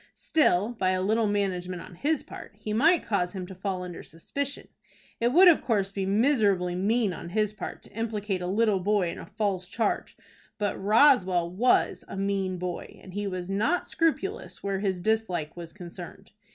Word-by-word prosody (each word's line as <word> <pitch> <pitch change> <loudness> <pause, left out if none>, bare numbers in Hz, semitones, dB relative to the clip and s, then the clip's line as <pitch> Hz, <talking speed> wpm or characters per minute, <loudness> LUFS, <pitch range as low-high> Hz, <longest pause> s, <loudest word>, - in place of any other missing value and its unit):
Still, 210 - +2
by 205 -6 0
a 185 - 0
little 220 +2 +2
management 185 -3 -1
on 180 - -11
his 295 - 0
part, - - -11
he 215 0 -4
might 320 +10 +4
cause 180 -4 0
him 185 -2 -5
to 190 - -9
fall 185 0 -3
under 175 -2 -7
suspicion. 280 - -5 0.5
It 235 - +2
would 360 +7 +7
of 340 - +6
course 200 -5 0
be 195 -1 -2
miserably 200 -5 +2
mean 205 +2 +1
on 170 - -7
his 210 +2 0
part - - -7
to - - -15
implicate 210 -4 -2
a 180 - -3
little 205 +1 +2
boy 195 -1 +1
in - - -8
a - - -9
false 195 -4 -2
charge; 215 +2 -2 0.4
but 205 -2 -1
Roswell 195 -7 +4
was 235 +7 +2
a - - -7
mean 195 -1 -1
boy, 180 -1 -5
and 185 - -11
he 205 +1 -2
was 185 -2 -4
not 215 - 0
scrupulous 385 +7 -1
where 195 -1 -1
his 190 -3 -1
dislike 185 -7 -1
was 170 -1 -8
concerned. 175 -2 -10
200 Hz, 185 wpm, -27 LUFS, 180-225 Hz, 0.5 s, would